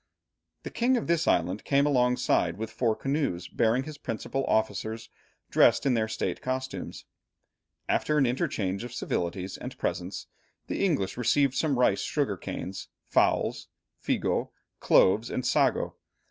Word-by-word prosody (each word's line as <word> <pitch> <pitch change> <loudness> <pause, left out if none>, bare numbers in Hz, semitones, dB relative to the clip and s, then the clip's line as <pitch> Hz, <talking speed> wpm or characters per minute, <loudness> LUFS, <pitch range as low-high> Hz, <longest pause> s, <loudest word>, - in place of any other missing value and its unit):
The - - -6
king 250 +2 +2
of 235 - -2
this 170 0 +1
island 90 +4 +1
came 140 0 +3
alongside, 125 -7 +2
with 110 +1 -5
four 115 -1 +1
canoes 135 - -2
bearing 120 +2 +1
his 150 0 -9
principal 135 +3 -3
officers 110 +1 -1 0.4
dressed - - +4
in 135 - +3
their 110 -2 +1
state 110 - -3
costumes. 130 +1 -4 0.8
After 150 - +1
an 140 - +4
interchange 120 - -1
of 120 0 -7
civilities 90 +2 -3
and - - -7
presents, - - -3 0.4
the - - -2
English 135 - 0
received 130 +3 +2
some 145 -2 0
rice, 120 -5 +3
sugar 140 -9 -1
canes, 90 +1 -6 0.2
fowls, - - +1 0.4
figo, - - 0 0.3
cloves, 105 +5 +4
and 125 - -3
sago. - - +1
125 Hz, 140 wpm, -28 LUFS, 105-140 Hz, 0.8 s, dressed